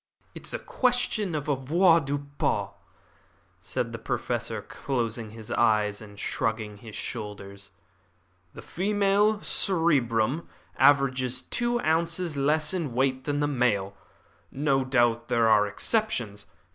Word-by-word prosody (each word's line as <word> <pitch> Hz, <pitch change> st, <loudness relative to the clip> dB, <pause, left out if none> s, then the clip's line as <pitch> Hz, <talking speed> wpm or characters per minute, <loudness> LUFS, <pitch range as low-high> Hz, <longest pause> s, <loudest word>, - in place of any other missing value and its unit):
"It -, -, -9 dB
is -, -, -4 dB
a -, -, -1 dB
question 245 Hz, -, 0 dB
of 150 Hz, -1 st, -3 dB
avoirdupois," 145 Hz, 0 st, +1 dB, 0.9 s
said -, -, -3 dB
the -, -, -6 dB
Professor, -, -, -3 dB
closing 115 Hz, -4 st, -3 dB
his 110 Hz, 0 st, -9 dB
eyes 105 Hz, -3 st, +2 dB
and 105 Hz, -1 st, -12 dB
shrugging 110 Hz, -1 st, -2 dB
his 110 Hz, 0 st, -11 dB
shoulders. 100 Hz, -1 st, -6 dB, 0.9 s
"The -, -, -10 dB
female 205 Hz, +2 st, +1 dB
cerebrum 145 Hz, -, +1 dB, 0.3 s
averages 130 Hz, -3 st, +3 dB
two 240 Hz, 0 st, -1 dB
ounces 165 Hz, +1 st, 0 dB
less 150 Hz, +3 st, +2 dB
in 155 Hz, -10 st, -3 dB
weight 130 Hz, 0 st, 0 dB
than 145 Hz, 0 st, -1 dB
the 145 Hz, -, +2 dB
male. 110 Hz, -8 st, 0 dB, 0.6 s
No 135 Hz, -1 st, +1 dB
doubt 120 Hz, -3 st, +1 dB
there 115 Hz, -2 st, +2 dB
are 105 Hz, -2 st, +5 dB
exceptions. 115 Hz, -, -1 dB
135 Hz, 120 wpm, -27 LUFS, 115-165 Hz, 0.9 s, are